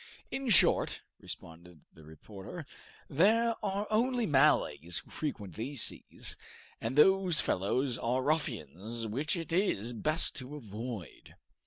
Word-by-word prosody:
"In 270 -2 -2
short," 195 - +4 0.2
responded 85 -1 -8
the 80 - -16
reporter, 95 - -10 0.4
"there 225 +10 +3
are 200 0 -1
only 240 +2 +2
Malays 135 - +3
who - - -6
frequent 105 - -4
these 120 - 0
seas, - - -4 0.4
and 115 +3 -3
those 185 0 +5
fellows 125 +7 0
are 125 +2 0
ruffians 115 - -2
which 135 - 0
it 165 -1 -5
is 120 - +1
best 155 +7 +1
to 135 +2 -6
avoid." 110 - -8
130 Hz, 125 wpm, -31 LUFS, 105-170 Hz, 0.4 s, those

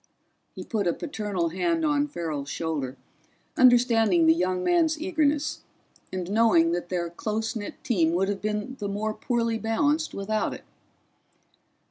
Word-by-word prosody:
He - - -6
put 210 -5 -2
a 170 - +2
paternal 205 - -3
hand 325 - 0
on 295 -1 +2
Farrell's 155 - -4
shoulder, 140 -4 -3 0.6
understanding 230 -8 +5
the 160 - +7
younger 180 +2 -1
man's 320 - +2
eagerness 310 -3 0 0.5
and 185 0 -4
knowing 210 -7 +4
that 175 0 -3
their 175 -2 -2
close 220 +5 -3
knit 205 -2 -5
team 170 -9 +2
would 190 +2 +1
have 200 -1 -3
been 215 +5 -3
the 205 -2 -3
more 215 +2 -2
poorly 230 -1 -1
balanced 290 +8 0
without 215 +2 -1
it. - - -12
215 Hz, 145 wpm, -26 LUFS, 175-255 Hz, 0.6 s, the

